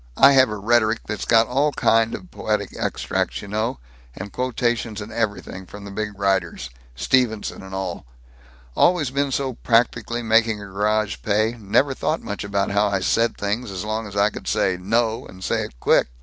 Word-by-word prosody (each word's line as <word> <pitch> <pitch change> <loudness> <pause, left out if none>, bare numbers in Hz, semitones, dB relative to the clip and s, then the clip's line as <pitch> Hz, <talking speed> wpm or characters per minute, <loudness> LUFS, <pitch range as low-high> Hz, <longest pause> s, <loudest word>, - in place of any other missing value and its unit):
I 140 - +8
have 130 -3 +5
a 105 - -4
rhetoric 115 +1 +2
that's 105 -2 -4
got 115 0 +5
all 140 +5 +1
kind 115 -1 +2
of 185 - -11
poetic 105 -2 -2
extracts, 65 +2 -2
you - - -8
know, 110 - -1 0.4
and 100 +2 -8
quotations 120 -3 -1
and 105 +1 -7
everything, 100 -4 -3
from 100 +2 -10
the 100 - -8
big 105 0 -4
writers, 95 -10 -1 0.2
Stevenson 110 - 0
and 95 0 -8
all. 95 -8 -4 0.7
Always 165 -7 +3
been 140 0 0
so 135 0 -1
practical, 120 0 +1
making 110 -1 +3
a 100 - -8
garage 105 +2 0
pay, 110 +2 +1
never 130 +7 +2
thought 155 +4 -2
much 100 - -4
about 100 -1 -1
how 105 +1 +3
I 100 -2 0
said 115 +4 +1
things 105 +4 -2
as 95 +1 -5
long 110 0 -2
as 100 - -10
I 100 +1 +3
could - - -9
say 95 - +1
'No!' 110 +5 0
and 95 0 -12
say - - 0
it - - -13
quick. - - +3
110 Hz, 190 wpm, -22 LUFS, 100-120 Hz, 0.7 s, I